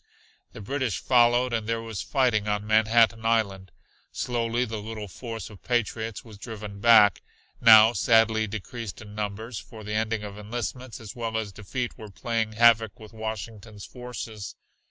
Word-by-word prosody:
The - - -9
British 130 0 -2
followed 120 0 +3
and 110 -2 -2
there 115 0 0
was 110 -4 -5
fighting 120 -7 +1
on 105 0 -1
Manhattan 110 +1 +3
Island. 100 -5 0 0.4
Slowly 120 0 -1
the 110 -2 -5
little 110 0 -6
force 115 +1 -7
of 100 - -14
patriots 115 -2 -2
was 105 -3 -13
driven 105 -3 -8
back, 105 -5 +6 0.4
now 110 0 +8
sadly 110 0 +3
decreased 110 +1 -6
in 105 -1 -12
numbers, 105 +2 -4
for 110 -2 -12
the 105 +1 -5
ending 110 0 -1
of 105 0 -8
enlistments 120 +3 -5
as 110 -4 -9
well 115 -2 -3
as 110 -2 -3
defeat 120 +5 -5
were 110 - -9
playing 115 +1 -2
havoc 115 -1 +4
with 110 -1 -13
Washington's 110 -1 -7
forces. 120 -4 -8
110 Hz, 155 wpm, -26 LUFS, 105-115 Hz, 0.4 s, now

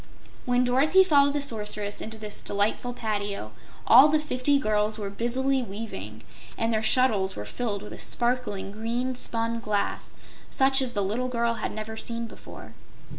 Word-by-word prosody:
When 245 0 +3
Dorothy 280 +10 +4
followed 285 -5 +4
the 290 - 0
Sorceress 210 -4 -1
into 220 0 -6
this 210 -1 -5
delightful 205 +4 -1
patio 205 - -3 0.3
all 275 - +9
the 305 +1 +3
fifty 285 -1 +1
girls 215 -4 0
were 200 -2 -4
busily 260 +5 0
weaving, 195 - -7 0.3
and 225 0 0
their 220 - +1
shuttles 220 -4 +2
were 105 - -6
filled 205 - -3
with 210 - -8
a - - -9
sparkling 240 -5 -1
green 235 +4 -2
spun 230 -1 -2
glass 210 -2 -2 0.3
such 270 0 +2
as 255 -2 -2
the 205 - 0
little 225 +6 -1
girl 235 -1 0
had - - -2
never 220 +1 -6
seen 230 +1 -4
before. 225 - -11
230 Hz, 165 wpm, -26 LUFS, 210-255 Hz, 0.3 s, all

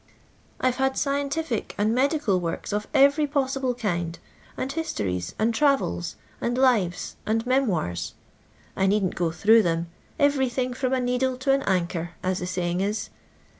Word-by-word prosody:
I 255 - +3
've 250 - -9
had 265 0 +1
scientific 280 -2 -1
and 215 +2 +2
medical 260 - +2
works 170 +3 -4
of 210 0 -2
every 280 +2 +4
possible 270 -3 0
kind, 175 -7 -2 0.4
and 265 - -2
histories, 95 - -3
and 225 +2 +1
travels, 225 - +1 0.3
and 240 +1 -1
lives, 225 -10 +1
and 225 +2 0
memoirs. 185 - 0 0.6
I 190 - +2
needn't 195 -2 +2
go 170 -1 0
through 220 +7 +5
them 170 -2 -1
— - - -32
every 270 -3 +1
thing, 250 +1 -2
from 255 +1 -1
a 260 - +2
needle 250 +1 0
to 260 +2 +1
an 275 0 +3
anchor, 175 -2 0
as 185 0 0
the 180 - -4
saying 180 -1 -1
is. 205 +2 -2
230 Hz, 165 wpm, -25 LUFS, 180-265 Hz, 0.6 s, through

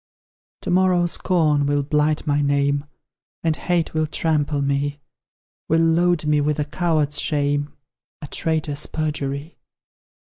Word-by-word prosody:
To 180 - -2
morrow, 180 -1 +3
Scorn 155 -5 +2
will 145 0 +1
blight 150 +2 +1
my 145 -1 +1
name, 140 0 +1 0.6
And 160 -2 +1
Hate 175 +1 -1
will 155 0 0
trample 150 -2 0
me, 140 +1 -1 0.7
Will 160 - +3
load 165 0 +2
me 150 -1 +2
with 150 0 0
a 150 - -1
coward's 155 -2 0
shame 145 -1 0 0.5
A - - -7
traitor's 155 -1 -1
perjury. 150 0 -4
150 Hz, 130 wpm, -22 LUFS, 145-160 Hz, 0.7 s, morrow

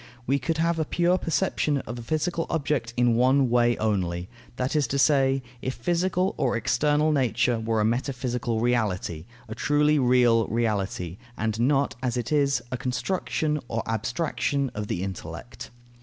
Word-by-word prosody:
We 140 +2 +1
could 155 +5 -2
have 165 0 +1
a - - +2
pure 175 +3 +1
perception 150 -1 0
of 120 +2 -7
a - - -6
physical 160 +6 -1
object 145 -7 -1
in 120 -1 +4
one 130 +2 +3
way 120 -1 +3
only; 90 -5 -1 0.3
that 130 +4 -2
is 145 -4 +2
to 140 - -1
say, 135 -2 +3 0.2
if 130 - -3
physical 180 +7 0
or 125 -4 +1
external 150 +6 +2
nature 120 -4 +1
were 110 0 0
a 105 - +2
metaphysical 125 -1 -1
reality, 105 -9 -1 0.2
a 110 - -6
truly 150 +4 +2
real 120 -3 +4
reality, 100 -6 -2 0.2
and 110 0 -2
not, 140 +3 +2
as 125 -2 -1
it 120 +1 -3
is, 140 -2 +2
a 130 - -1
construction 150 +4 -1
or 115 -1 -2
abstraction 130 +4 -1
of 105 0 -4
the 90 - -2
intellect. 95 -2 -7
125 Hz, 160 wpm, -26 LUFS, 115-145 Hz, 0.3 s, in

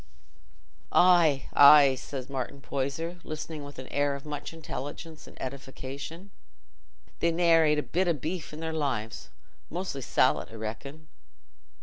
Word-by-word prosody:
'" - - -34
"Aye, 170 -6 +5
aye," 140 -1 +8
said 130 0 -6
Martin 135 0 -5
Poyser, 140 +6 -3
listening 155 0 -6
with 145 0 -10
an 130 - -7
air 145 0 0
of 140 - -9
much 145 -1 -5
intelligence 160 0 -7
and - - -15
edification, 140 +7 -7 0.9
"they 170 - +2
ne'er 165 -1 +4
ate 150 0 +3
a 150 - 0
bit 185 +2 0
o' 170 - +3
beef 160 +4 -5
i' 150 - -9
their 160 0 -4
lives. 125 -8 -3 0.4
Mostly 175 -5 -4
sallet, - - +2
I - - -10
reckon." 135 +8 -7
145 Hz, 145 wpm, -28 LUFS, 135-165 Hz, 0.9 s, aye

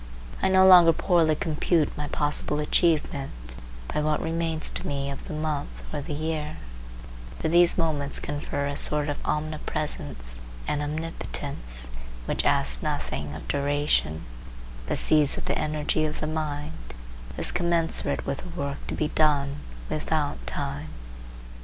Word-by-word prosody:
I - - +3
no 190 0 +6
longer 175 -3 +9
poorly 165 -3 +3
compute 160 -1 +1
my 150 0 -3
possible 150 0 0
achievement 145 - 0 0.4
by - - +1
what 150 0 +1
remains 165 -1 -2
to - - -4
me 140 0 -2
of 140 - -8
the - - -5
month 155 -2 -3
or 150 - -2
the 150 +1 -4
year; 155 0 -3 0.8
for 70 - -1
these 175 +1 +8
moments 150 -4 0
confer 145 -1 -3
a 140 0 -2
sort 150 +1 +1
of 145 - -3
omnipresence 150 - -2 0.3
and 150 - 0
omnipotence 145 - -4 0.4
which - - -1
asks - - +3
nothing 70 +1 -3
of 80 - -8
duration, 140 - +1 0.6
but - - 0
sees 150 -2 +4
that - - -5
the - - 0
energy 155 0 0
of 155 0 -3
the - - -2
mind 155 - -4 0.4
is - - +1
commensurate 170 -4 0
with 135 - -2
the 175 -1 -8
work 140 0 -2
to - - -3
be 150 - 0
done, 145 -3 +2 0.3
without 150 - -1
time. 70 +5 -3
150 Hz, 145 wpm, -26 LUFS, 140-160 Hz, 0.8 s, longer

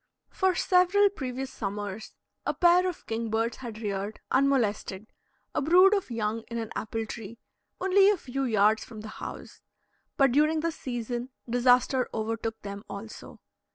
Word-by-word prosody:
For 375 -2 +1
several 370 +4 +4
previous 265 -6 -5
summers 205 0 -5 0.3
a - - -1
pair 360 +1 +5
of 355 - -9
kingbirds 225 0 -1
had 235 -4 -8
reared, 200 +1 -3
unmolested, 225 -7 +1 0.4
a - - 0
brood 365 +7 +6
of 395 -7 0
young 225 -1 -2
in 235 - -5
an 225 -2 -4
apple 225 +1 -3
tree, 220 +1 -8 0.4
only 385 +1 +5
a 415 - +3
few 270 -3 -3
yards 215 -2 +3
from 220 -3 -10
the 215 - -8
house; - - -8 0.6
but 275 -3 +5
during 305 +4 +3
this 335 0 -2
season 240 0 -4 0.2
disaster 245 +1 +3
overtook 225 0 -3
them 200 0 -6
also. 210 +2 -9
240 Hz, 150 wpm, -28 LUFS, 220-305 Hz, 0.6 s, brood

